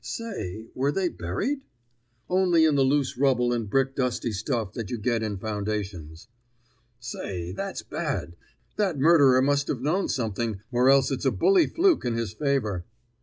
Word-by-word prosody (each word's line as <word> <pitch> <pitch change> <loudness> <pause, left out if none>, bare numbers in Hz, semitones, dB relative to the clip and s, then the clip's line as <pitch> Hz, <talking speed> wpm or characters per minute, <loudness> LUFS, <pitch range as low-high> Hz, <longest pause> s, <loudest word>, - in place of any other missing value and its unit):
"Say, 110 - -5
were 135 +2 0
they 185 +3 0
buried?" 160 - -3 0.7
"Only 180 -3 +3
in 155 - +3
the 140 - +3
loose 135 -1 +1
rubble 125 -3 +2
and 115 -4 -2
brick 135 +3 +1
dusty 125 -2 -1
stuff 110 0 -2
that 115 -5 -5
you 120 - -3
get 115 +1 0
in 105 -2 -3
foundations." 100 -5 -4 0.7
"Say, 90 -7 -5
that's 195 - -5
bad! 150 - -4 0.4
That 195 -7 0
murderer 140 -4 +5
must 140 +1 +1
have 125 - -2
known 175 +7 0
something, 115 -3 -2
or 125 +1 +3
else 135 0 +4
it's 135 +1 -3
a - - +5
bully 380 -4 +4
fluke 350 -1 +2
in 120 -2 -1
his 115 -3 -3
favor." 115 -10 -1
130 Hz, 165 wpm, -26 LUFS, 110-145 Hz, 0.7 s, murderer